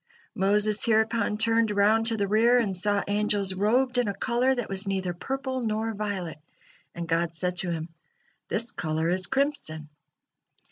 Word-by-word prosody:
Moses 205 +2 +2
hereupon 220 -1 +1
turned 225 +1 +4
around 210 +2 +3
to 225 -1 +1
the 200 -1 0
rear, 230 +4 +4
and 210 -6 0
saw 205 +2 0
angels 205 -1 +1
robed 245 +6 +1
in 245 - +1
a 200 - -2
color 250 +3 +1
that 245 -3 -3
was 195 +1 -4
neither 190 -2 -2
purple 265 +7 -4
nor 225 0 -2
violet, 200 -6 -4 0.6
and 170 0 -5
God 165 0 0
said 180 +2 -2
to 180 - +1
him: 165 -1 -3 0.6
"This 230 +3 -1
color 160 0 -2
is 185 0 0
crimson." 265 - -2
210 Hz, 160 wpm, -26 LUFS, 185-230 Hz, 0.6 s, turned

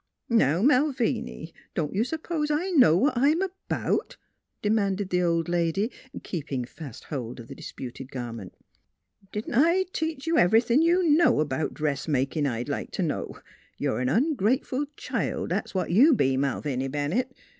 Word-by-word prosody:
" - - -51
Now, 185 - +3
Malviny, 255 - +1 0.2
don't 150 -3 -1
you 205 +3 +2
s'pose 315 +2 -3
I 325 +6 0
know 250 - +6
what 275 +10 +3
I'm 295 +9 +3 0.3
'bout? - - -1 0.2
" - - -54
demanded 200 -2 0
the 180 0 +2
old 170 -1 +1
lady, 175 +6 0 0.3
keeping 140 -7 -4
fast 135 -1 -10
hold 125 -5 -5
of 115 - -10
the - - -8
disputed 130 +1 -8
garment. 115 -7 -7 0.4
" 90 - -34
Didn't 210 +3 -4
I 335 +9 +4
teach 320 -3 -3
ye 330 - 0
ev'rythin' 230 - +4
you 345 +3 +3
know 300 - +4
'bout 145 +2 -3
dressmakin', 145 0 0
I'd 120 -1 -3
like - - -3
t' - - -2
know? - - -3 0.4
You're - - -1
a - - 0
ongrateful 255 - +1
child; - - -2
that's - - -2
what 185 - -1
you 265 - +6
be, 135 - +2
Malviny 135 -1 -1
Bennett. 150 - -2
190 Hz, 160 wpm, -26 LUFS, -, 0.4 s, know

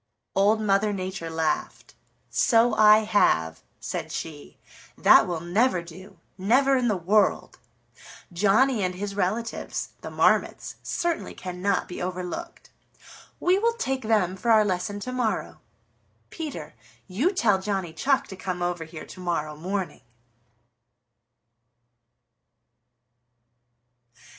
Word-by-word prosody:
Old 205 +3 +3
Mother 210 0 +2
Nature 185 -3 -5
laughed. 160 -1 -2 0.4
"So 230 0 +3
I 215 0 +6
have," 80 - +2 0.2
said - - -5
she. 75 0 -7 0.4
"That - - +6
will 170 -3 -3
never 180 +2 +1
do, 180 +2 -13 0.2
never 265 +8 +3
in 250 -2 +1
the 210 -4 +1
world. 200 +5 +1 0.7
Johnny 210 +7 +3
and 180 0 -1
his 200 +2 -4
relatives, 210 +4 -2
the - - -7
Marmots, - - +1
certainly 340 -1 -2
cannot 185 +2 -2
be 180 - -7
overlooked. 185 - -6 0.7
We 365 +2 +3
will 465 +2 +2
take 270 - -2
them 210 -5 +1
for 235 +5 -3
our 215 -2 +6
lesson 200 +1 -2
to 255 - -5
morrow. 250 -3 -2 0.7
Peter, 315 -3 -6 0.3
you 230 - +1
tell 210 - +2
Johnny 190 -5 -3
Chuck 265 - +1
to 190 - -7
come 185 -1 -4
over 175 -2 -2
here 160 0 -9
to - - -12
morrow 165 -4 -2
morning." 185 0 -4
200 Hz, 120 wpm, -25 LUFS, 180-230 Hz, 0.7 s, I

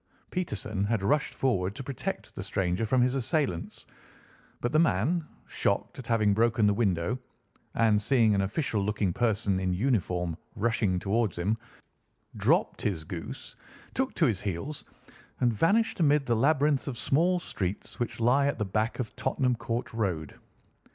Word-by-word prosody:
Peterson 110 - -2
had 105 -2 0
rushed 145 +7 +2
forward 100 -7 0
to - - -6
protect 130 -1 -5
the - - -6
stranger 95 +3 -1
from 125 +2 +3
his 125 0 +2
assailants; 130 - -1 0.7
but 120 - -1
the 155 - +4
man, 160 - +2 0.2
shocked - - -1
at 125 - -8
having 110 -3 +3
broken 115 0 +3
the 105 - +4
window, 100 +1 0 0.6
and 110 -2 +3
seeing 115 -2 +4
an 100 - +2
official 105 +2 -1
looking 100 -3 0
person 105 -5 +1
in 95 -1 0
uniform 90 -6 0 0.2
rushing 110 -4 +1
towards 100 +1 0
him, 95 +6 +1 0.8
dropped - - +2
his 90 -7 -1
goose, 85 +1 -7 0.4
took - - 0
to - - +3
his 95 -4 +1
heels, 105 - -4 0.6
and 120 -2 +3
vanished 200 - +2
amid 150 -3 +3
the 120 - +2
labyrinth 145 +3 +2
of 130 -4 -3
small 170 +9 +2
streets 100 - -4
which 120 -1 -3
lie 130 +5 +4
at 140 - 0
the 105 - -1
back 110 +4 -1
of 125 -4 -4
Tottenham 130 -2 0
Court 115 0 -3
Road. 90 -9 -2
115 Hz, 160 wpm, -28 LUFS, 100-135 Hz, 0.8 s, the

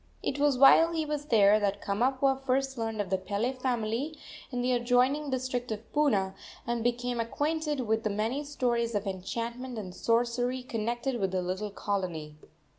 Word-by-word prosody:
It 280 - -2
was 285 -2 +3
while 325 +5 +7
he 320 -1 0
was 295 -1 -3
there 210 -5 +5
that 200 -1 0
Kamapuaa 260 +7 +1
first 270 +1 0
learned 225 -2 -3
of 195 -2 -6
the 190 - +2
Pele 205 +7 -1
family 255 +3 -2 0.3
in 245 -1 -2
the 255 - +1
adjoining 250 +4 +2
district 255 -2 -2
of 220 +1 -6
Puna, 210 -11 +2 0.3
and 235 -1 -1
became 245 0 -1
acquainted 295 +4 -1
with 220 -2 0
the 215 - -1
many 220 +8 -1
stories 240 -5 -1
of 205 0 -1
enchantment 230 +6 -4
and 185 -4 -6
sorcery 245 +4 0
connected 240 +2 -2
with 195 -2 +1
the 185 -1 -1
little 190 +4 -3
colony. 180 -7 -3
240 Hz, 170 wpm, -29 LUFS, 210-265 Hz, 0.3 s, while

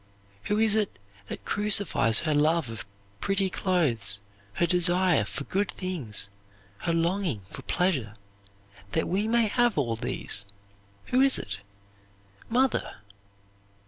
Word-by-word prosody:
Who 210 - +1
is 220 -1 +4
it 210 - 0 0.5
crucifies 200 - +3
her 155 -2 +1
love 150 -3 +2
of 115 -1 -7 0.3
pretty 195 - +1
clothes, 120 - +1 0.3
her 170 - +2
desire 175 0 +3
for - - -4
good 195 +7 -1
things, 125 - -5 0.5
her 170 - -1
longing 165 - 0
for - - -7
pleasure 140 - 0 0.8
that 160 - +1
we 200 +4 0
may 230 0 +3
have 240 -1 +2
all 120 -6 +1
these? 100 -2 -3 0.6
Who 255 - +4
is 270 0 +5
it? 95 -1 -5 0.9
Mother!" 255 +2 +1
175 Hz, 120 wpm, -27 LUFS, 125-205 Hz, 0.9 s, is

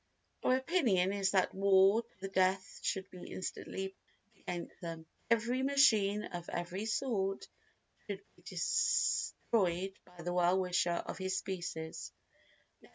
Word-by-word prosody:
Our 255 - +4
opinion 250 - +2
is 195 -1 +1
that 190 -2 +2
war 195 +2 +5
to 235 -4 -29
the 195 - -3
death 190 0 +1
should 190 -1 -1
be 180 - -9
instantly 190 +1 -4 0.3
proclaimed 205 +1 -30 0.3
against - - -28
them. 165 -2 -6 0.2
Every 235 +3 +2
machine 220 -7 +4
of 175 -3 -6
every 180 +5 -3
sort 210 -4 -1 0.6
should 200 -1 -5
be - - -22
destroyed 190 -3 +1
by 180 -1 -13
the 175 +1 -2
well 180 +1 +3
wisher 175 -2 +1
of - - -6
his 190 0 -1
species. 170 -4 -4
190 Hz, 135 wpm, -34 LUFS, 180-210 Hz, 0.6 s, war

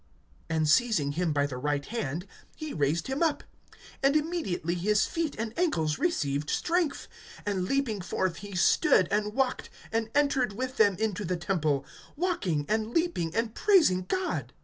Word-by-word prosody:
(7)And 160 -1 +1
seizing 175 - +3
him 170 +2 0
by 145 -1 +2
the 135 -3 -5
right 145 +1 -1
hand, 175 - -3 0.3
he 310 -1 -6
raised 150 +3 0
him 265 +3 -3
up. 320 -3 +1 0.6
And 275 +1 +3
immediately 300 - -1
his 210 +4 +2
feet 330 -3 -2
and 225 0 -3
ankles 160 - +1
received 150 - 0
strength; 345 -4 0 0.4
(8)and 190 -3 -1
leaping 260 -8 0
forth, 180 -1 -1
he 205 -2 -8
stood, 180 0 +4
and 210 +1 0
walked, 265 -1 0 0.2
and 225 0 -1
entered 275 -6 +2
with 260 +4 -4
them 205 -3 +5
into 210 0 -2
the 180 -1 -1
temple, 155 -6 0 0.3
walking, 285 - -1
and 220 +1 -1
leaping, 325 - 0
and 225 -1 0
praising 310 - +4
God. 375 -1 -2
210 Hz, 160 wpm, -28 LUFS, 165-275 Hz, 0.6 s, them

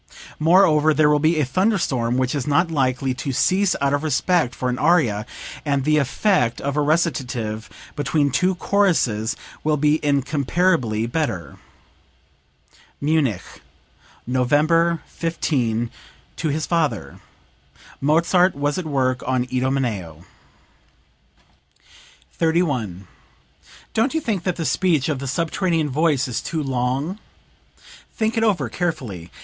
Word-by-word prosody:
Moreover 155 -2 +4
there 150 0 +4
will 150 - +3
be 155 +1 +2
a 150 - +2
thunder 190 - +1
storm 125 -7 -1
which 130 0 0
is 140 -3 -3
not 165 +4 +2
likely 130 -3 0
to 130 +2 -4
cease 185 +8 +2
out 140 0 +1
of 145 - +1
respect 155 -2 +1
for 125 - -3
an 125 0 -2
aria, 125 -10 +2 0.4
and 140 -2 0
the 155 +2 +3
effect 140 - +1
of 140 0 -3
a 150 - +2
recitative 130 -9 -1 0.3
between 145 0 +1
two 180 +9 +1
choruses 155 - +1 0.3
will 155 0 +1
be 150 +2 +2
incomparably 140 -3 +1
better." 115 - -3 1.4
(Munich, 140 - +1 0.8
November 155 +7 +2
15, 120 -9 -2 0.4
to 160 - -2
his 155 +2 -1
father. 155 - -1 0.8
Mozart 170 +5 +3
was 145 +4 -1
at 180 - -5
work 130 -4 0
on 130 -1 +1
"Idomeneo.") 120 - -2 2.1
31. 145 - 0 0.9
"Don't 255 +7 +1
you - - +2
think 210 - -3
that 180 -2 0
the 165 - -4
speech 165 -7 +1
of 145 -4 -1
the 135 - -5
subterranean 165 +2 0
voice 145 -2 +1
is 120 -3 -3
too 160 -2 -3
long? 135 - -2 1.0
Think 220 0 0
it 225 - +1
over, 210 -5 +1
carefully. 115 - -4
145 Hz, 125 wpm, -21 LUFS, 125-165 Hz, 2.1 s, Moreover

